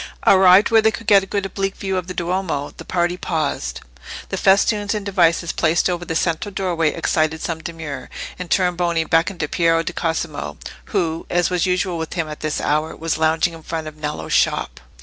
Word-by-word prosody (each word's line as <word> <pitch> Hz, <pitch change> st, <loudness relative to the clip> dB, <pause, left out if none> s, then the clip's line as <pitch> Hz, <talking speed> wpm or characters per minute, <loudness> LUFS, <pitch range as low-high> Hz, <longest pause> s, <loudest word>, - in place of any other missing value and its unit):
Arrived 190 Hz, +2 st, +6 dB
where 225 Hz, -1 st, +6 dB
they 220 Hz, -, +4 dB
could 225 Hz, +1 st, -6 dB
get 205 Hz, -2 st, +6 dB
a 195 Hz, -, -8 dB
good 200 Hz, 0 st, -2 dB
oblique 195 Hz, 0 st, -2 dB
view 190 Hz, -1 st, -3 dB
of 180 Hz, -1 st, -2 dB
the 185 Hz, -, -5 dB
Duomo, 175 Hz, -5 st, -2 dB
the -, -, -8 dB
party 175 Hz, 0 st, 0 dB
paused. 145 Hz, -, -2 dB, 0.5 s
The -, -, -2 dB
festoons 205 Hz, +2 st, +2 dB
and 210 Hz, -1 st, -4 dB
devices 170 Hz, -3 st, +2 dB
placed 165 Hz, +1 st, +2 dB
over 175 Hz, 0 st, -3 dB
the 160 Hz, -, -3 dB
central 165 Hz, +5 st, 0 dB
doorway 175 Hz, -5 st, 0 dB
excited 160 Hz, -1 st, 0 dB
some 165 Hz, 0 st, -3 dB
demur, 160 Hz, -5 st, -6 dB, 0.3 s
and 180 Hz, -1 st, -6 dB
Tornabuoni 175 Hz, -3 st, +1 dB
beckoned 165 Hz, +3 st, +1 dB
to 150 Hz, -, 0 dB
Piero 165 Hz, 0 st, +2 dB
di -, -, -4 dB
Cosimo, 165 Hz, -1 st, -3 dB, 0.3 s
who, 165 Hz, -5 st, -2 dB
as 175 Hz, +1 st, +1 dB
was 180 Hz, +1 st, +1 dB
usual 180 Hz, -1 st, 0 dB
with 160 Hz, -, -4 dB
him 165 Hz, -3 st, -1 dB
at 150 Hz, 0 st, -7 dB
this 155 Hz, -1 st, -2 dB
hour, 155 Hz, +2 st, 0 dB
was 165 Hz, -1 st, -2 dB
lounging 160 Hz, +2 st, +2 dB
in 165 Hz, -, -10 dB
front 160 Hz, 0 st, -4 dB
of 155 Hz, -, -8 dB
Nello's 150 Hz, 0 st, -4 dB
shop. -, -, +1 dB
170 Hz, 200 wpm, -20 LUFS, 160-190 Hz, 0.5 s, Arrived